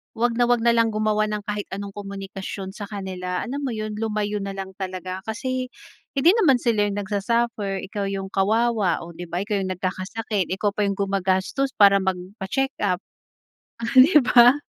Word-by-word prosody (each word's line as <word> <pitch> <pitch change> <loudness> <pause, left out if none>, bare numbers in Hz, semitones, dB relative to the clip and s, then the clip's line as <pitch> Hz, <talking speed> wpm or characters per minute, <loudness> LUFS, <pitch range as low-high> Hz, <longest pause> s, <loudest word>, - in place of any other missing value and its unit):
wag 235 +1 0
na 240 - +4
wag 240 -1 +2
nalang 230 -2 +3
gumawa 215 0 +1
ng 210 -1 -3
kahit 210 -1 -4
anong 200 0 -5
komunikasyon 195 -1 -6
sa 205 0 -7
kanila, 185 -3 -4
alam 265 +4 -4
mo 240 - -2
yun? 215 -1 -4
Lumayo 210 -1 -1
nalang 195 -1 -5
talaga. 185 -1 -4
Kasi 255 +3 -2 0.5
hindi 285 +5 +5
naman 285 -11 +5
sila 215 -4 +2
yung 200 - -2
nagsa-suffer, 210 -1 -1
ikaw 200 +1 -4
yung 195 -1 -4
kawawa 215 -2 +1
o 170 - -9
di 175 +1 -8
ba? 175 +3 -3
Ikaw 205 -1 -1
yung 185 - -2
nagkakasakit, 195 +2 -2
ikaw 205 +1 0
pa 205 0 -1
yung 200 - 0
gumagastos 195 +7 0
para 200 -1 +6
magpa-checkup. 190 +2 -2 0.8
Ah 230 +4 -4
di 290 +5 +8
ba? 245 +1 +6
205 Hz, 165 wpm, -23 LUFS, 195-230 Hz, 0.8 s, di